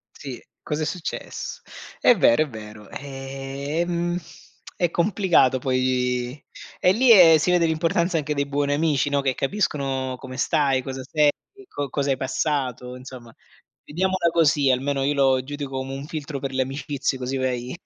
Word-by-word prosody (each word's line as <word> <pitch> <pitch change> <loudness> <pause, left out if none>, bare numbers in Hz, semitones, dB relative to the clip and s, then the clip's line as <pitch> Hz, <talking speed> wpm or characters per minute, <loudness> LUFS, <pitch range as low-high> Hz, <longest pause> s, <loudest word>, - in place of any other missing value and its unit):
Sì, 135 -4 -7 0.2
cos'è 150 +1 -2
success 175 0 -5 0.4
È - - +6
vero, 120 +7 +4
è 155 - -7
vero. 105 -2 -10
Ehm, 140 +6 -3 0.6
è 175 - +1
complicato 175 -9 +3
poi, 125 0 0 0.4
e 180 - +4
lì, 240 +3 +5
ehm, 170 -6 +9
si 155 - 0
vede 175 -1 +4
l'importanza 165 +2 +1
anche 150 -1 -1
dei 140 - 0
buoni 145 0 0
amici, 145 -2 +1
no, 140 0 +1
che 135 -1 +1
capiscono 135 -6 -1
come 130 0 -9
stai, 140 -5 +2
cosa 135 0 -5
sei, 150 +2 +3 0.4
co 145 - -4
cosa 140 +1 -1
hai 130 - 0
passato, 130 -2 -2
insomma, 125 -2 -11 0.5
vediamola 185 +1 0
così. 150 -4 +3
Almeno 135 +2 0
io 145 +2 +1
lo 135 -2 +3
giudico 140 -1 -5
come 135 +1 -4
un 135 +1 -6
filtro 150 -2 -5
per 135 0 -4
le 130 0 +1
amicizie, 135 0 -3
così 130 +1 -3
vai 125 -1 -2
140 Hz, 160 wpm, -23 LUFS, 130-155 Hz, 0.6 s, ehm